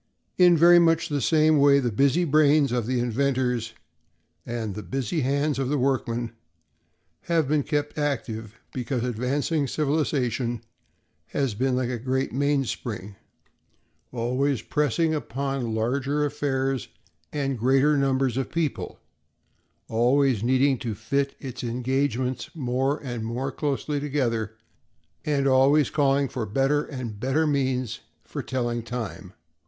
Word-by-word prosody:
In 175 -2 +7
very 175 +2 +7
much 165 0 +3
the 145 -2 -1
same 155 0 +4
way, 140 0 +6
the 125 -4 0
busy 140 +9 +3
brains 150 -2 +4
of 120 -3 -1
the 130 -1 0
inventors 125 -1 0 0.7
and 115 -3 -3
the 105 - -6
busy 135 - -2
hands 140 +2 0
of 135 -2 -1
the 145 - +1
workmen 120 -3 -1 0.9
have 165 -4 +1
been 150 +1 +2
kept 145 +1 -2
active 115 -6 -3
because 125 -1 -2
advancing 135 +5 -1
civilization 130 -5 -1 0.6
has 135 -5 -1
been 130 +4 0
like 125 -1 -1
a 120 - -3
great 130 +2 -1
mainspring, 130 -7 -2 1.0
always 125 +1 0
pressing 150 +2 +1
upon 135 -4 -2
larger 135 +6 0
affairs 135 -2 -1 0.4
and 135 -4 -2
greater 135 +5 +3
numbers 135 -3 +1
of 135 - -2
people, 165 -4 -2 0.9
always 125 +1 +2
needing 130 +2 +2
to 115 -4 -4
fit 140 +6 -1
its 130 -2 -7
engagements 125 +1 -1
more 135 0 0
and 120 -4 -4
more 125 +4 -3
closely 145 +1 -2
together, 120 -7 -1 0.7
and 140 -2 +1
always 135 +2 +4
calling 140 -1 +2
for 120 -4 -4
better 135 +7 +1
and 120 -7 -6
better 135 +7 +1
means 130 -5 0 0.2
for - - -6
telling 120 -2 -2
time. 110 -5 -6
135 Hz, 130 wpm, -25 LUFS, 120-145 Hz, 1.0 s, In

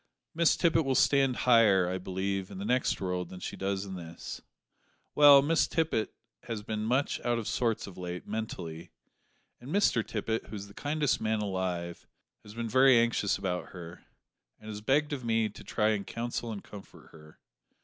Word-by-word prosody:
Miss 165 0 +3
Tippet 165 -2 +3
will 135 -2 0
stand 135 -2 +3
higher, 110 -7 +5
I 95 +1 -2
believe, 95 +1 -3
in 100 - -9
the 100 - -5
next 125 +3 +1
world 90 -2 -3
than 90 - -9
she - - -5
does 95 0 -2
in 95 - -7
this. 85 -2 -8 0.7
Well, 145 -2 +8
Miss 160 +2 +2
Tippet 160 -10 0 0.3
has 110 -3 -5
been 110 0 -3
much 130 +5 0
out 120 -1 +1
of 115 - -4
sorts 115 -3 0
of 95 -2 -11
late, 90 0 -6
mentally; 90 -7 -5 0.7
and 125 - -11
Mr 180 - +2
Tippet, 110 +1 -3
who 105 - -8
is 100 0 -7
the 100 - -15
kindest 145 +1 -1
man 110 0 0
alive, 90 -3 -3 0.3
has 105 +1 -13
been 115 0 -3
very 130 +2 +6
anxious 115 -3 +2
about 90 -2 -4
her, 85 -2 -10 0.6
and 110 - -11
has 105 -1 -6
begged 145 +6 +1
of 135 -3 -4
me 115 -1 +1
to 105 - -12
try 110 0 +1
to 100 - -4
counsel 115 +2 -4
and 105 -2 -6
comfort 100 -2 -13
her. 75 -1 -16
110 Hz, 185 wpm, -30 LUFS, 95-125 Hz, 0.7 s, Well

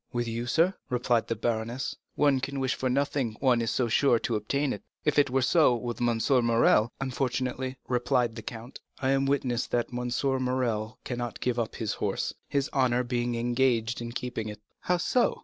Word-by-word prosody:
"With 120 -1 -1
you, 115 +1 -3
sir," 165 +8 +3 0.2
replied 125 -2 +1
the 115 - -1
baroness, 115 +3 -2 0.2
"one 140 -2 +3
can 135 +1 -3
wish 130 -1 +1
for 130 - -1
nothing, 130 -4 0
one 125 -3 +3
is 115 - 0
so 125 - +1
sure 120 +2 +4
to 115 0 -2
obtain 140 +7 0
it. 105 - -7 0.2
If 150 -1 +3
it 140 - +4
were 130 0 +1
so 150 -2 +4
with 120 0 -4
M. 120 -1 +2 0.2
Morrel——" 115 -1 +4
"Unfortunately," 130 0 -2
replied 125 -1 +1
the 115 - -6
count, 115 +3 -8 0.2
"I 135 0 +1
am 135 0 +2
witness 130 -4 0
that 120 0 -1
M. 125 0 -2 0.3
Morrel 115 -4 -1
cannot 120 -2 -4
give 125 -1 0
up 115 - -2
his 110 -3 -2
horse, - - -2 0.2
his 140 -1 +1
honor 125 -2 +2
being 120 -1 -1
engaged 120 -1 +1
in 120 0 -5
keeping 120 -3 -4
it." 105 -1 -8 0.2
"How 180 - +1
so?" 245 +7 +1
125 Hz, 190 wpm, -28 LUFS, 115-130 Hz, 0.3 s, sure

